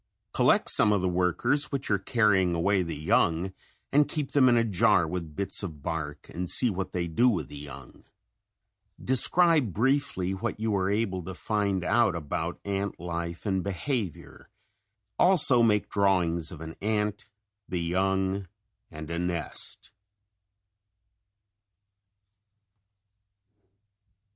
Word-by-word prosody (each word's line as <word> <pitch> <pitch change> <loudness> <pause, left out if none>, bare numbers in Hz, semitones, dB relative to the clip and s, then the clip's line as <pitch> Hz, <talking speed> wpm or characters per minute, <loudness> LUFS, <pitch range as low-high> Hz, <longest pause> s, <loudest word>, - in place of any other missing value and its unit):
Collect - - +3
some 105 - +5
of 100 -3 +1
the - - +1
workers 90 - 0
which 135 -5 -3
are 100 - +2
carrying 95 -5 +2
away 95 +3 +1
the 85 -3 -4
young 85 +2 +1 0.4
and 145 0 +3
keep 150 -2 -3
them 130 -3 +5
in 120 - +4
a 115 - +3
jar 105 -6 +3
with 85 -4 -6
bits 100 0 -1
of 80 -8 -7
bark 75 -2 -5
and 90 0 -4
see 120 +5 +4
what 95 -1 -4
they 85 -1 -2
do 120 +10 +3
with 100 -7 -2
the - - -10
young. 70 -2 -11 1.0
Describe 150 - +3
briefly 120 - 0
what 95 +2 -4
you 110 -1 -1
are 95 -1 0
able 100 -3 -1
to 95 +2 -8
find 100 -2 -1
out 105 -2 +2
about 80 +2 -4
ant 100 0 -3
life 85 +1 -5
and 95 -3 0
behavior; 100 - -4 0.7
also 160 -9 +5
make 105 -3 +2
drawings 90 -5 +1
of 80 -3 -10
an 80 0 -8
ant, 105 0 -2 0.4
the 90 - -2
young 95 +2 -1 0.4
and 80 +1 -9
a 85 - -2
nest. 90 -1 -3
95 Hz, 135 wpm, -27 LUFS, 85-110 Hz, 1.0 s, some